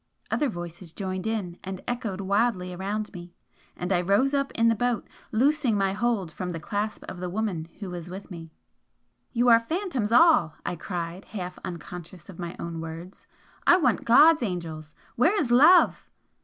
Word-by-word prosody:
Other 295 - +1
voices 175 -3 -7
joined 190 +2 -4
in 200 -6 -3
and 190 0 -5
echoed 220 -6 -3
wildly 195 -2 0
around 205 +4 -3
me 175 -1 -10 0.4
and 180 +2 -1
I 175 - +2
rose 200 +10 +2
up 275 -1 0
in 230 0 +3
the 230 - +5
boat, 240 -1 -1 0.2
loosing 260 -1 +2
my 195 -1 +1
hold 210 -6 -1
from 180 +1 -5
the 165 -2 -4
clasp 205 +6 -3
of 180 - -7
the 180 0 -3
woman 185 -5 -2
who 195 -4 -6
was 175 -1 -7
with 190 +2 -9
me. 165 -2 -9 0.8
"You 240 0 +1
are 230 -1 +8
phantoms 265 - -2
all!" 235 - +5
I - - -2
cried, 175 +1 -5
half 180 -3 -6
unconscious 175 +1 -8
of 185 - -11
my 175 -1 -5
own 170 -1 -5
words 165 +3 -9 0.4
"I 350 - +8
want 260 -10 +1
God's 305 +7 +6
angels! 165 -7 -5 0.2
Where 340 - +3
is 250 -9 -1
Love?" 305 +9 +6
195 Hz, 175 wpm, -26 LUFS, 175-235 Hz, 0.8 s, are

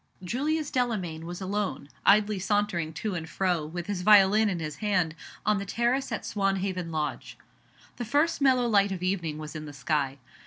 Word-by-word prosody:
JULIUS 290 - -1
DELAMAYN 185 -11 -1
was 175 +2 -6
alone, 195 -5 -2 0.2
idly 210 0 +5
sauntering 195 -4 0
to 210 +5 -3
and 165 -2 -5
fro, 180 -4 0
with 175 +2 -5
his 200 -2 -3
violin 210 +2 +6
in 185 - -1
his 155 -3 -5
hand, 185 -6 +1 0.3
on 210 -1 +3
the - - -3
terrace 240 +6 0
at - - -3
Swanhaven 195 -3 -1
Lodge. 155 -2 -3 0.6
The 240 - -3
first 295 +7 +1
mellow 255 -3 +4
light 200 -3 +3
of 185 -2 -4
evening 175 -5 -1
was 155 0 -7
in 155 0 -5
the 145 - -9
sky. 140 0 -1
195 Hz, 180 wpm, -28 LUFS, 165-215 Hz, 0.6 s, violin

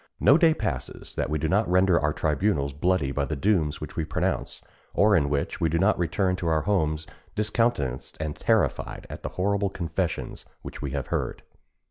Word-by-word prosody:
No 140 - +6
day 160 -1 +5
passes 65 - -4
that - - -2
we 75 - 0
do 80 +2 -1
not 100 +3 +2
render 90 -1 +4
our 75 - +1
tribunals 75 -2 0
bloody 75 -1 +1
by 70 +1 -1
the 75 - -3
dooms 80 -2 +1
which 75 - -7
we 80 - -1
pronounce, 75 -2 -2 0.4
or 105 0 +5
in 70 -5 +2
which 70 -1 -2
we 80 - +3
do 85 - +1
not 95 +5 +3
return 90 +2 +1
to 85 - -3
our 80 -1 +2
homes 80 -5 0 0.3
discountenanced 105 - 0
and 75 -1 -3
terrified - - 0
at - - -7
the - - -4
horrible 100 +1 +1
confessions 85 -2 -3 0.2
which - - -8
we 70 - -3
have 70 -1 -3
heard. - - -2
85 Hz, 190 wpm, -26 LUFS, 75-95 Hz, 0.4 s, No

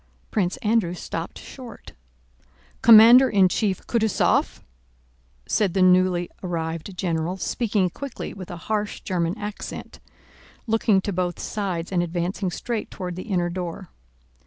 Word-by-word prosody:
Prince 190 -4 0
Andrew 210 -5 +1
stopped 165 -1 -6
short. 250 -5 -11 0.9
"Commander 235 +3 +9
in 195 -3 +5
Chief 195 0 -1
Kutúzov?" 220 -3 +1 0.8
said 200 -4 0
the 190 - +4
newly 180 -1 +4
arrived 165 +1 -4
general 170 0 -1
speaking 205 -1 0
quickly 275 +8 -7
with 185 -3 -9
a 175 - -6
harsh 210 -1 -2
German 175 +1 -1
accent, 210 -1 -7 0.7
looking 220 -3 +2
to 200 - -3
both 175 -1 -1
sides 185 -5 -3
and 180 -2 +1
advancing 175 +3 -2
straight 225 +4 -4
toward 180 -2 -6
the 185 +5 -8
inner 175 -3 0
door. 180 0 -5
185 Hz, 130 wpm, -24 LUFS, 175-215 Hz, 0.9 s, Commander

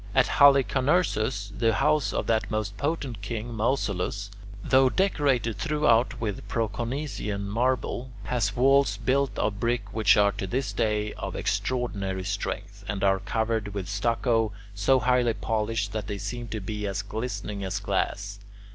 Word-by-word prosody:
At 135 - +5
Halicarnassus, 135 - +3
the 115 0 +2
house 150 -2 +2
of - - -1
that 110 -1 +1
most 110 -2 -2
potent 140 -7 -3
king 115 +3 -4
Mausolus, 105 -4 -1 0.3
though 130 0 +5
decorated 135 - +1
throughout 150 -5 +2
with 105 -4 -4
Proconnesian 115 -2 -3
marble, 125 +3 -1
has 115 -3 -1
walls 135 -3 +4
built 135 +5 0
of 100 -1 -1
brick 115 -3 -1
which 110 -1 +4
are 100 -1 +5
to 95 - -5
this 130 +7 -2
day 105 -1 0
of - - -6
extraordinary 100 -7 -1
strength, 100 +2 -4
and 100 -2 -3
are 95 -1 +3
covered 110 -2 -2
with 95 -3 -3
stucco 115 +2 +1 0.2
so 125 +6 +3
highly 125 -1 +2
polished 105 0 -1
that 105 -2 -4
they 105 -1 -3
seem 115 +4 -5
to 110 -1 -4
be 105 +1 -4
as 100 0 -2
glistening 105 -2 -4
as 95 +1 -2
glass. 100 0 -2
110 Hz, 145 wpm, -27 LUFS, 100-125 Hz, 0.3 s, At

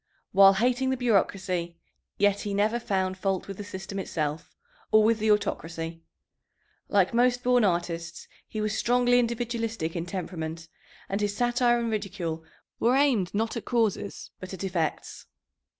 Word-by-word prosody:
While 195 0 +7
hating 250 +5 +1
the 265 - 0
bureaucracy, 190 -7 0 0.4
yet 205 0 +3
he 205 -1 -3
never 215 +4 +1
found 190 -4 -1
fault 195 -1 -1
with 195 -1 -7
the 205 - -5
system 195 0 -6
itself 155 -4 -3 0.4
or 215 0 +6
with 225 +1 +3
the 220 +1 +1
autocracy. 165 -5 -1 0.9
Like 195 -1 +3
most 245 +1 +2
born 245 -1 +4
artists, 170 -2 -2 0.2
he 215 - -4
was 215 0 -1
strongly 245 +1 +3
individualistic 230 -6 -2
in 170 0 -3
temperament, 165 -3 -5 0.4
and 195 +2 -2
his 205 -1 -1
satire 240 0 +3
and 235 -1 -1
ridicule 185 -6 -3 0.4
were 240 +3 +3
aimed 255 -10 +2
not 225 +3 0
at 230 - -5
causes, 220 -4 -1
but 185 +1 -7
at 185 - -8
effects. 175 -5 -3
205 Hz, 150 wpm, -27 LUFS, 180-235 Hz, 0.9 s, While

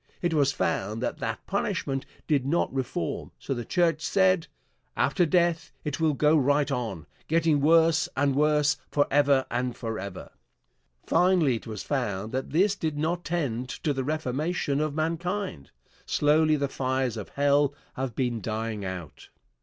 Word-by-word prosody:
It 175 -2 0
was 140 -3 +3
found 100 +1 -1
that - - -2
that - - -4
punishment 135 -1 -2 0.2
did 145 -5 +2
not 145 +3 0
reform, 135 +6 -3
so 135 - -3
the 120 -2 -4
church 165 +3 +1
said: 185 -1 +2 0.5
"After 175 -4 +2
death 170 -1 +1
it 150 -1 -3
will 155 -2 +2
go 150 +3 +4
right 145 0 +2
on, 110 - -3 0.2
getting 160 -2 +2
worse 160 0 +4
and 140 0 +2
worse, 150 0 +3
forever 145 -2 +3
and 125 0 -2
forever." 100 -5 -6 0.7
Finally 170 -7 +3
it - - -12
was 110 -3 -5
found 110 -7 -2
that 130 +1 -3
this 190 +6 +3
did 155 -5 -3
not 170 +3 -1
tend 130 -8 -2
to 150 - -2
the 135 -1 -2
reformation 150 +1 -1
of 155 -1 -1
mankind. 165 - -2 0.4
Slowly 155 +1 +3
the 140 -1 0
fires 130 -2 -1
of 110 -3 -6
hell 145 0 +2 0.2
have 130 -3 -4
been 120 -4 -1
dying 110 -1 -3
out. 90 -4 -7
145 Hz, 155 wpm, -27 LUFS, 125-160 Hz, 0.7 s, go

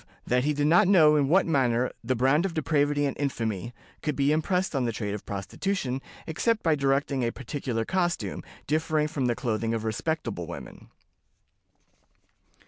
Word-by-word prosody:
That 125 +2 +1
he 150 - +2
did 145 0 0
not 175 +6 +5
know 160 -6 +6
in 145 -2 +3
what 185 +4 +4
manner 130 -6 +1
'the 130 - 0
brand 135 +7 +3
of 195 -3 -3
depravity 145 -2 +1
and 140 - -1
infamy' 115 -6 -2 0.3
could 150 -2 -1
be 140 +1 +2
impressed 180 +3 0
on 130 -2 +1
the 115 - 0
trade 105 -2 -3
of 105 - -7
prostitution, 130 - -3 0.2
except 220 +8 0
by 160 - +3
directing 140 -1 +1
a 115 - 0
particular 125 -3 -3
costume, 175 -2 -1 0.2
differing 155 0 +1
from 140 -4 -1
the 120 - +1
clothing 115 -2 -1
of 110 - -3
respectable 115 - -2
women." - - -9
140 Hz, 165 wpm, -27 LUFS, 120-160 Hz, 0.3 s, know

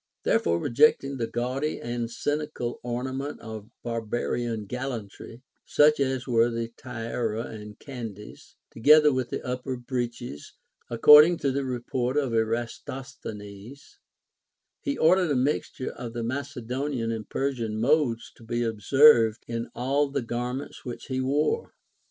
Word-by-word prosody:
There - - +3
fore 85 0 +1
rejecting 135 - +3
the 115 -2 -1
gaudy 130 +6 -2
and 120 -1 -3
scenical 145 -2 -3
ornament 130 +4 -4
of 110 -1 -8
barba 115 0 -2
rian 115 -4 -2
galhintry, 120 -1 -6 0.2
such 150 0 +4
as 130 -2 0
were 120 -2 +3
the 115 -1 -3
tiara 115 -2 -3
and 105 -2 -9
candys, 115 -7 -9 0.2
together 150 +5 +6
with 130 -2 -1
the - - -5
upper 125 +1 -3
breeches, 120 - -5 0.4
according 150 +8 +8
to 140 - +1
the 140 +1 -1
report 125 +1 -2
of 135 -4 +1
Eratos 120 +4 -3
thenes, 105 - -10 0.8
he 285 -2 -2
ordered 180 +2 +4
a 145 - +2
mixture 130 0 -1
of 120 -2 -7
the 120 -1 -3
Macedonian 130 -1 -3
and 110 -2 -5
Per 140 +1 0
sian 110 -4 -3
modes 125 -2 +1
to - - -16
be 120 +1 -1
observed 115 +1 +5
in 115 0 -4
all 140 +4 +1
the 140 -2 -2
garments 125 +3 -4
which 120 -3 -7
he 130 0 -1
wore. 145 - 0
125 Hz, 140 wpm, -26 LUFS, 115-140 Hz, 0.8 s, according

